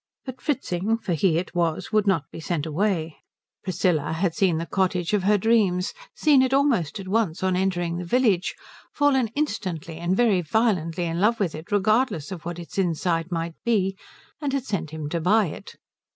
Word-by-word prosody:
But 260 -1 -8
Fritzing, 225 - -1
for 205 -6 -3
he 165 +1 +2
it 180 - -3
was, 170 0 -1
would 215 -1 +2
not 185 -7 +2
be - - -8
sent 165 -2 -2
away. 165 -1 -1 0.5
Priscilla 170 -5 0
had 170 +1 0
seen 180 -4 +2
the 165 - -3
cottage 185 -1 0
of 205 - +3
her 205 +2 +3
dreams, 200 -4 +2 0.2
seen 290 -4 +4
it 260 0 +2
almost 235 - +1
at 190 - -7
once 190 -4 0
on 185 -1 +2
entering 175 -2 0
the 180 - -4
village, 205 -2 +1 0.4
fallen 275 -4 +2
instantly 185 - -3
and 175 +3 0
very 220 -7 +3
violently 175 -3 0
in 165 +1 -2
love 230 +3 +3
with 185 -6 0
it 155 +5 -9
regardless 205 - +1
of 175 -4 -7
what 175 0 -4
its 175 +3 -6
inside 170 -1 0
might 165 -1 -2
be, 195 -5 +1 0.5
and 285 -2 -1
had 275 -2 -1
sent 180 - -3
him 155 -1 -5
to 170 +1 -2
buy 210 +5 +4
it. - - -10
185 Hz, 190 wpm, -24 LUFS, 170-215 Hz, 0.5 s, seen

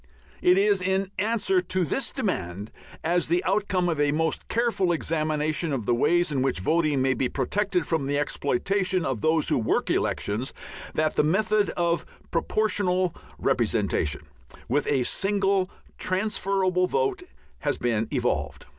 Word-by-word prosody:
It 180 +1 +5
is 200 -1 +3
in 190 +1 0
answer 205 -3 +2
to 185 0 0
this 265 - -2
demand, 100 - -3 0.3
as 175 +2 +1
the 175 +3 +1
outcome 195 -2 +1
of 165 -4 -1
a 145 0 +3
most 160 +2 -1
careful 230 -6 +1
examination 155 -1 0
of 125 -6 -2
the 120 - +2
ways 175 +7 +2
in 135 -3 0
which 135 - 0
voting 155 - +1
may 130 0 +3
be 125 0 -1
protected 185 +6 0
from 160 -4 0
the 145 0 0
exploitation 180 +6 0
of 130 -6 -2
those 160 -1 +2
who - - +2
work 110 - 0
elections, 110 +6 -1 0.4
that 155 0 +1
the - - +5
method 205 +5 +2
of 170 -1 +1 0.3
Proportional 185 -1 +1 0.2
Representation 75 - 0 0.5
with 145 +4 0
a 135 -3 +2
single 195 +3 +1 0.3
transferable 185 -2 +1
vote 405 - 0 0.4
has - - -1
been 115 -3 0
evolved. - - -2
175 Hz, 145 wpm, -26 LUFS, 145-195 Hz, 0.5 s, It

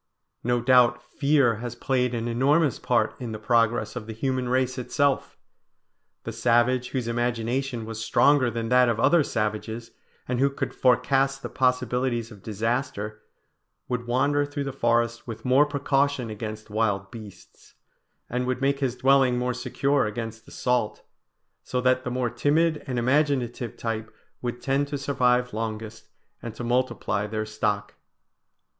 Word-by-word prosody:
No 120 0 +1
doubt 125 -1 +5
fear 140 -6 +2
has 120 +1 -6
played 125 -1 0
an 115 0 -2
enormous 135 +4 +2
part - - +1
in 115 -3 -4
the - - -4
progress 115 0 +1
of 105 - -6
the 110 - -5
human 130 +1 -1
race 130 0 0
itself. 140 +2 0 0.9
The - - -5
savage 120 +1 +2
whose 125 -3 -3
imagination 120 +1 -1
was 110 0 -5
stronger 135 +3 +4
than 115 -1 -3
that 125 -1 +5
of 115 -1 0
other 170 +6 +4
savages, 110 0 -3 0.4
and 125 -1 -1
who 140 +1 +4
could 140 - -4
forecast 135 +2 +2
the - - -4
possibilities 125 -2 0
of 105 -3 -13
disaster, 110 0 -3 0.7
would 125 -1 -3
wander 140 +4 +2
through 145 0 -4
the 140 -1 -4
forest 120 -2 0
with 115 0 -7
more 135 +4 +5
precaution 140 -4 0
against 110 0 -7
wild 105 -3 0
beasts, 110 -5 -13 0.5
and 125 +1 -2
would 130 0 -1
make 140 +1 +1
his 130 -3 -1
dwelling 130 -1 +4
more 125 0 0
secure 130 +1 0
against 115 +1 -6
assault; 125 -4 -1 0.6
so 125 - -2
that 130 0 +2
the 125 - -3
more 125 -1 -1
timid 155 +2 +1
and 130 -2 -2
imaginative 125 -2 0
type 115 -1 -4 0.3
would 120 0 -4
tend 140 +2 +1
to 145 0 -3
survive 125 -3 +1
longest 110 0 -5 0.3
and 115 -2 -7
to 120 - -6
multiply 120 -4 0
their 110 0 -3
stock. 105 -1 -2
125 Hz, 150 wpm, -25 LUFS, 115-130 Hz, 0.9 s, doubt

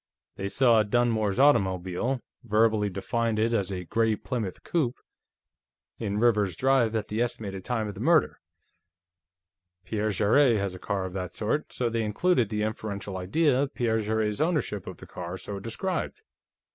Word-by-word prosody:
They 100 0 -3
saw 120 -1 +4
Dunmore's 110 -2 +1
automobile, 95 -1 +2 0.2
verbally 110 -2 +2
defined 115 +4 -1
as 110 -3 +1
a 90 -1 -4
'gray 110 +5 +1
Plymouth 110 -5 -4
coupé' 135 -7 0 1.0
in 105 -3 -2
Rivers's 105 -5 +2
drive 130 -3 +2
at 110 -2 -2
the 110 +2 -1
estimated 100 -6 -3
time 115 -2 -1
of 105 - -5
the 95 - -10
murder. 155 +4 +3 1.5
Pierre 110 +2 -1
Jarrett 115 +5 +4
has 100 -2 -2
a 90 - -9
car 95 0 -2
of 95 - -6
that 90 -2 -5
sort, 110 +8 -1
so 125 - -1
they 115 0 -1
included 115 - +1
the 105 -1 -1
inferential 105 -2 -4
idea 130 - +2
of 140 0 -2
Pierre 115 -3 +1
Jarrett's 110 +1 -1
ownership 150 - -1
of - - -7
the - - -11
car 90 0 -6
so 100 +1 -6
described. 180 - -3
110 Hz, 160 wpm, -27 LUFS, 100-120 Hz, 1.5 s, saw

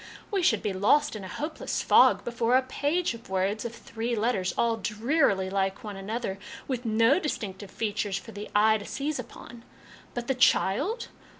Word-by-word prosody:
We 395 -2 +1
should 225 - +2
be 205 - -1
lost 260 +9 +3
in 210 - -6
a - - -6
hopeless 305 - -3
fog - - +5
before 235 0 +1
a 260 - +1
page 290 +5 0
of 230 -2 -12
words 195 +4 -1
of 235 0 -5
three 235 +1 -4
letters, 210 -5 0
all 230 -1 +2
drearily 215 -1 +1
like 195 +3 -1
one 210 -2 -6
another, 195 0 -4 0.3
with 250 -2 -3
no 230 +7 +4
distinctive 205 - -4
features 205 -2 -2
for 225 - -9
the 205 0 -7
eye 215 +1 +5
to 205 - -9
seize 285 0 -3
upon; 240 -1 -10 0.5
but 240 -1 -3
the 265 - +1
child 270 - +2
225 Hz, 180 wpm, -27 LUFS, 200-255 Hz, 0.5 s, fog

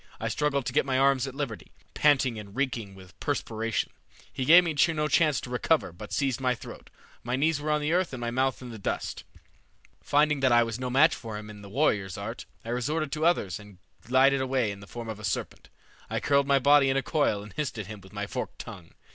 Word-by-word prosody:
I - - -2
struggled 140 -3 0
to - - -3
get - - +3
my 135 -1 0
arms 135 0 +3
at 135 - -7
liberty, 135 -7 -5 0.2
panting 135 -6 +3
and 100 -1 -11
reeking 120 -8 -2
with 95 -1 -15
perspiration. 115 0 -2 0.4
He 130 - -2
gave 170 +5 +8
me 165 -3 -2 0.2
no 150 0 0
chance 150 -1 +3
to 125 - -8
recover, 135 - +1
but 100 +5 -10
seized 135 -3 0
my 125 -1 +2
throat. - - -11 0.3
My 125 +1 -2
knees 145 +2 +1
were 155 - -3
on 150 0 +2
the 150 +2 0
earth 180 0 +1
and 130 - -6
my 120 0 -2
mouth 130 +1 0
in 125 - -8
the 115 -2 -8
dust. - - -3 0.8
"Finding 150 0 +2
that 130 -1 +3
I 120 0 +6
was 115 0 -4
no 125 -1 -3
match 145 +6 +5
for 110 -3 -6
him 105 0 -8
in 105 -1 -12
the 100 - -11
warrior's 100 -7 0
art, 110 +4 -6 0.2
I - - -6
resorted 140 +5 -1
to 155 +1 -1
others 105 - +1
and 105 -2 -14 0.3
glided 130 +2 +4
away 130 -4 0
in 100 - -8
the 100 - -12
form 120 +1 -7
of 110 -2 -6
a - - -11
serpent. 95 - -4 0.4
I - - -1
curled 140 -1 +2
my 140 -1 +4
body 140 0 +5
in 135 - +2
a 135 - 0
coil 125 -10 +1
and 105 -2 -12
hissed 145 -2 -3
at 105 - -4
him 105 +1 -9
with 95 - -16
my 105 0 -4
forked 125 +5 -5
tongue. 95 -8 -10
130 Hz, 240 wpm, -28 LUFS, 110-140 Hz, 0.8 s, gave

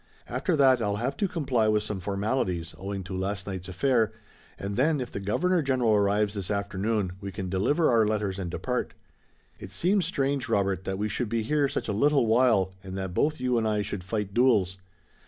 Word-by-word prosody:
After 180 - 0
that 130 -4 +5
I'll 100 -2 0
have 125 +6 -2
to 200 - +1
comply 135 -11 0
with 105 -1 +2
some 105 -2 -4
formalities, 100 -3 -1
owing 95 0 -4
to 95 +1 -6
last 95 +1 -2
night's 95 -2 -5
affair, 115 +2 +2 0.5
and 100 +1 -4
then 150 +5 +2
if 125 -2 -4
the - - -4
Governor 170 - +1
General 130 -5 +2
arrives 105 0 +2
this 100 -4 -4
afternoon, 100 0 -1
we 100 -1 -5
can 95 -1 -5
deliver 145 - +2
our 115 -2 +4
letters 105 -3 -1
and 90 -2 -3
depart. - - -3 0.6
It 100 - -8
seems 175 - +1
strange, 135 -7 -1
Robert, 100 -4 0
that 95 0 -2
we 105 +2 -1
should 110 +2 -2
be 115 0 0
here 145 +4 +2
such - - -3
a 105 - -1
little 140 +4 +3
while 110 -5 +3
and 95 0 -6
that 95 -2 -4
both 150 - +1
you 125 -1 +1
and 110 - 0
I 105 -1 +1
should 100 -2 -5
fight 100 +1 -3
duels. 105 -7 +3
105 Hz, 205 wpm, -27 LUFS, 95-130 Hz, 0.6 s, that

